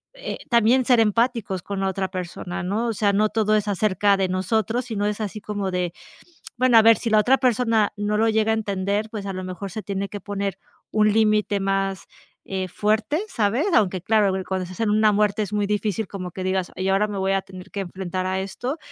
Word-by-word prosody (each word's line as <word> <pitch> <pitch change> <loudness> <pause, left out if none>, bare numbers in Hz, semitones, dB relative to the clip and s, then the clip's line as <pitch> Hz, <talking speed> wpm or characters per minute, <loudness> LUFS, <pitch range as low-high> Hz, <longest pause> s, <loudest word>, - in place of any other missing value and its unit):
eh, - - -5
también 235 +2 +4
ser 245 -3 +4
empáticos 220 -3 +1
con 200 -1 -4
la 195 - 0
otra 190 0 -1
persona, 180 -1 -5
¿no? 205 +6 -1
O 230 - 0
sea, 205 -1 +1
no 215 +2 +3
todo 215 -1 +1
es 210 -1 0
acerca 205 0 +2
de 195 -1 0
nosotros, 220 +6 0
sino 210 -4 -2
es 210 0 -2
así 215 0 -4
como 205 -2 -3
de, 180 -1 -1 0.7
bueno, 245 -1 +5
a - - +7
ver 225 -1 +7
si 230 - -3
la 215 - +5
otra 255 +5 +4
persona 230 -4 +2
no 205 +1 -1
lo 225 +1 +3
llega 220 0 +2
a - - +3
entender, 205 0 -1
pues 210 -3 -6
a 195 - -3
lo 185 0 -5
mejor 185 +1 -6
se 215 - -5
tiene 200 0 -3
que 205 - -7
poner 200 -1 -3 0.4
un 215 -1 +3
límite 215 -2 +2
más, 195 0 -1 0.4
eh, 190 -1 -3
fuerte, 215 - 0
¿sabes? 235 - 0
Aunque 190 -3 +2
claro, 210 +1 +2
cuando 190 -1 -2
se 180 - -9
hacen 220 +2 -1
una 215 0 +4
muerte 210 +1 +1
es 205 -1 -5
muy 205 -1 0
difícil 210 +1 -1
como 185 -2 -6
que 185 +2 -6
digas 185 -1 -1
y 185 +1 -2
ahora 195 +2 +2
me 205 - -4
voy 190 0 +1
a 195 0 +1
tener 190 0 -12
que 200 - -3
enfrentar 185 0 -4
a 185 0 -1
esto. 245 +10 -4
205 Hz, 225 wpm, -23 LUFS, 190-220 Hz, 0.7 s, a